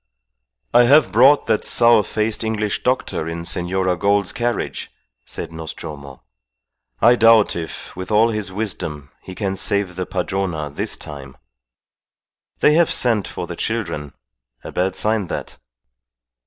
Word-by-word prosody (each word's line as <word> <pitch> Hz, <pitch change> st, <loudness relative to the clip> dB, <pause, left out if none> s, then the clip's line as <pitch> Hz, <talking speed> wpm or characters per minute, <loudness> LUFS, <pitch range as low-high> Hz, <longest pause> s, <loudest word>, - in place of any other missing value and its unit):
"I 120 Hz, 0 st, +6 dB
have 145 Hz, +5 st, +5 dB
brought 135 Hz, +6 st, +5 dB
that 110 Hz, -2 st, +1 dB
sour 120 Hz, -2 st, +5 dB
faced 110 Hz, +2 st, -2 dB
English 105 Hz, -2 st, -1 dB
doctor 125 Hz, -10 st, -1 dB
in 85 Hz, 0 st, -5 dB
Senora 90 Hz, +1 st, 0 dB
Gould's 100 Hz, +1 st, +1 dB
carriage," 120 Hz, 0 st, -3 dB, 0.3 s
said -, -, -6 dB
Nostromo. 75 Hz, -4 st, -8 dB, 0.8 s
"I 120 Hz, +2 st, +7 dB
doubt 115 Hz, -2 st, +5 dB
if, 80 Hz, -2 st, -7 dB
with 95 Hz, +1 st, -7 dB
all 110 Hz, +2 st, +4 dB
his 105 Hz, -3 st, -4 dB
wisdom, 85 Hz, -8 st, -4 dB
he 95 Hz, -, -10 dB
can 95 Hz, +1 st, -2 dB
save 100 Hz, -2 st, 0 dB
the 90 Hz, 0 st, -4 dB
Padrona 85 Hz, -7 st, -2 dB
this -, -, -3 dB
time. 70 Hz, -3 st, -10 dB, 1.2 s
They 150 Hz, -, +5 dB
have 170 Hz, +1 st, +4 dB
sent 115 Hz, -5 st, +1 dB
for -, -, -5 dB
the -, -, -7 dB
children. 85 Hz, -11 st, -3 dB, 0.5 s
A -, -, -7 dB
bad 95 Hz, +1 st, -1 dB
sign 105 Hz, -3 st, 0 dB
that." -, -, -6 dB
100 Hz, 140 wpm, -20 LUFS, 85-115 Hz, 1.2 s, I